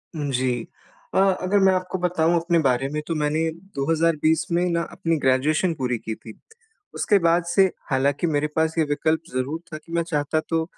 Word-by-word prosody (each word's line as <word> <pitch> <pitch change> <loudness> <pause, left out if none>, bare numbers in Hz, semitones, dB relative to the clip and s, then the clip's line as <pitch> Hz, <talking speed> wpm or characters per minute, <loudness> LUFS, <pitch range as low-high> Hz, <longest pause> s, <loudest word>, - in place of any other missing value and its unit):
जी 130 -4 -1 0.5
अ - - +4 0.2
अगर 195 +2 +2
मैं 190 - +5
आपको 185 0 -2
बताऊँ 175 -1 +1
अपने 170 0 +1
बारे 135 -2 +1
में 150 +1 -3
तो 165 - -1
मैंने 150 +1 0 0.4
2020 160 +2 +1
में 175 +1 +2
न 170 0 0
अपनी 165 -1 -1
ग्रेजुएशन 150 +7 +2
पूरी 125 -3 -1
की 110 0 -5
थी। 110 - -12 0.6
उसके 205 - +3
बाद 170 0 +3
से 185 +3 +4 0.2
हालाँकि 140 +5 +1
मेरे 150 -1 0
पास 160 0 +1
ये 160 - +4
विकल्प 155 +2 +1
ज़रूर 135 +5 -2
था - - -3
कि 160 +2 -16
मैं 170 0 +1
चाहता 155 -1 -1
तो 165 -1 +1
160 Hz, 185 wpm, -23 LUFS, 140-170 Hz, 0.6 s, मैं